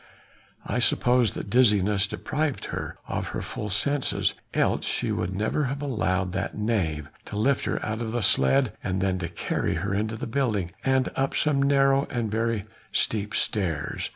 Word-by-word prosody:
I 115 - -1
suppose 125 -1 +3
that - - -5
dizziness 105 -4 +4
deprived 145 +6 -2
her - - -4
of - - -2
her - - -3
full 105 - -5
senses, 135 +8 +1 0.2
else - - +1
she - - 0
would 95 - -2
never 110 +9 0
have 135 +2 -3
allowed 95 - 0
that 100 +2 -3
knave 90 -9 -1 0.2
to - - -7
lift 130 +6 +2
her - - -1
out 110 +1 -3
of 110 -1 -3
the 120 -1 -1
sledge 130 +4 +4
and 95 -1 -1
then 95 -1 0
to 85 -1 -3
carry 85 - -1
her 95 +5 -2
into 110 +2 -1
a - - -5
building, 110 -8 0
and 130 -1 +2
up 135 0 0
some 145 -2 +3
narrow 140 0 +3
and 120 -5 -2
very 115 -1 0 0.3
steep 105 -2 0
stairs. 85 -8 -1
110 Hz, 175 wpm, -26 LUFS, 100-130 Hz, 0.3 s, dizziness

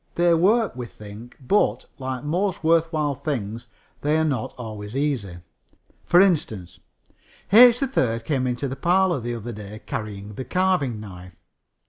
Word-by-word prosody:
They 175 0 +3
work, 205 - +2
we 125 -1 -6
think, 105 +3 -12
but, 190 +10 +1
like 130 -1 -4
most 175 +4 -1
worth 165 0 +3
while 150 -3 0
things, 120 -6 -4 0.3
they 150 +2 +1
are 160 - +2
not 135 -7 -2
always 110 -2 -7
easy. 130 -11 -2 0.7
For 175 - +5
instance, 115 - +1 0.7
H. 245 +2 +8
3rd 120 - 0
came 130 -2 0
into 125 +3 -2
the 135 - -5
parlor 175 +2 +2
the 120 0 -4
other 120 +1 -6
day 105 0 -9
carrying 105 -1 -6
the 130 - -6
carving 180 - 0
knife. 90 -4 -11
130 Hz, 150 wpm, -23 LUFS, 110-170 Hz, 0.7 s, H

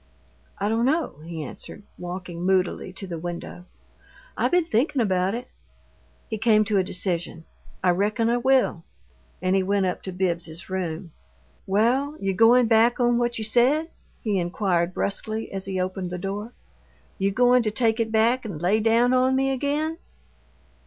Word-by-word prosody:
"I 200 - -1
don't 225 +2 +1
know," 300 - 0
he 165 -1 -6
answered, 200 +8 -6
walking 175 -1 -6
moodily 185 0 0
to 190 +1 -6
the 170 -3 -6
window. 175 +1 -7 0.7
"I - - +1
been 355 -2 +2
thinkin' 280 +1 +1
about 190 -2 +1
it." 245 +1 -6 0.8
He 220 -2 -4
came 215 -1 +4
to 210 -1 +1
a - - +2
decision. 175 -3 -2 0.4
"I 180 - +4
reckon 210 +5 +1
I 235 +1 +2
will." 255 -9 +2 0.6
And 185 +1 +2
he 195 - +3
went 195 +1 +1
up 180 - -2
to 190 - -6
Bibbs's 175 -1 -3
room. 175 -2 -3 0.6
"Well, 250 +9 +1
you 195 -1 -1
goin' 235 +5 +5
back 225 +2 +4
on 240 -1 +3
what 240 0 0
you 220 - -3
said?" 260 +9 +2 0.3
he 210 -5 0
inquired, 175 0 0
brusquely, 215 +2 -3
as 195 -1 -3
he 190 -1 -3
opened 185 0 -3
the 180 - -4
door. 200 +5 -5 0.7
"You 195 +1 +2
goin' 245 +4 +4
to 220 - 0
take 225 +1 +1
it 225 -1 0
back 230 +3 +3
and 200 -9 -6
lay 185 +6 +2
down 230 +3 +3
on 255 +1 +3
me 270 0 +1
again?" 295 +5 -1
210 Hz, 170 wpm, -24 LUFS, 185-240 Hz, 0.8 s, goin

